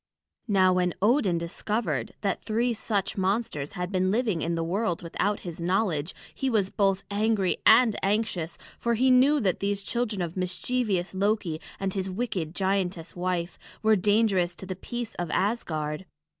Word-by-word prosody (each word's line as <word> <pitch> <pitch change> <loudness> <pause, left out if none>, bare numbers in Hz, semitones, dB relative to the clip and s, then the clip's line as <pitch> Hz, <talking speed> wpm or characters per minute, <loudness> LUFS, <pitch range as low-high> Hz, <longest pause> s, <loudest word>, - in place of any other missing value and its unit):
Now 190 -3 +4
when 180 -1 +1
Odin 210 -4 +3
discovered 170 - -2
that 195 -2 -1
three 235 +2 +1
such 205 -3 -1
monsters 190 -7 -1
had 180 0 -4
been 185 -1 +1
living 215 -5 +1
in 170 +2 -1
the 165 - -1
world 180 +1 -1
without 200 +4 -1
his 170 -2 -7
knowledge, 175 -3 0 0.2
he 270 - -1
was 205 -5 +1
both 195 -1 +1
angry 205 -2 +1
and 225 -1 +7
anxious, 195 -5 -1 0.2
for 235 0 +1
he 255 +3 +4
knew 270 +4 +5
that 190 -5 +1
these 200 0 -1
children 215 -3 -1
of 170 -1 -5
mischievous 190 +1 -1
Loki 190 -5 0 0.2
and 195 -1 -1
his 190 -1 -2
wicked 185 -6 -3
giantess 190 -3 -1
wife 175 -1 -2 0.2
were 220 0 +5
dangerous 200 -3 +2
to - - -9
the 185 0 -4
peace 240 +4 -5
of 175 -2 -2
Asgard. 165 -5 -1
195 Hz, 160 wpm, -27 LUFS, 175-220 Hz, 0.2 s, and